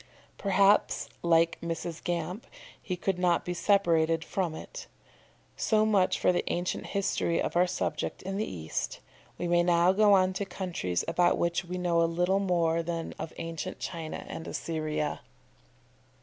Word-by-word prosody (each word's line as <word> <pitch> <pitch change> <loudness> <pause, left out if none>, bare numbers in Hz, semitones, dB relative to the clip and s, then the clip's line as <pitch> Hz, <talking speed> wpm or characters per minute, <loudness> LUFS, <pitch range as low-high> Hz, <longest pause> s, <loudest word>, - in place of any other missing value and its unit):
Perhaps 200 +1 +3
like 165 0 +3
Mrs. 170 0 -4
Gamp 175 +4 -3 0.3
he 185 - -3
could 180 +1 -2
not 175 -2 +2
be 180 - -2
separated 165 -4 +2
from 180 -5 -2
it. - - -9 0.7
So 215 -1 +2
much 200 -4 +3
for - - +3
the 175 - 0
ancient 175 +1 -2
history 190 -3 0
of - - -2
our 180 +1 +4
subject 180 - -3
in 195 +1 -3
the 215 - -2
East. 80 -3 -4 0.4
We 175 - -2
may 175 0 +4
now 175 +1 +4
go 205 +1 +5
on 185 -1 +4
to 190 - -2
countries 170 - -3
about 175 0 +3
which 170 +1 0
we 180 +1 -4
know 175 -2 +2
a - - +4
little 180 +3 +1
more 170 -4 +1
than 165 0 -4
of 165 - -5
ancient 165 -1 -5
China 165 -3 -5
and 165 - -7
Assyria. 155 -2 -2
175 Hz, 160 wpm, -29 LUFS, 165-190 Hz, 0.7 s, go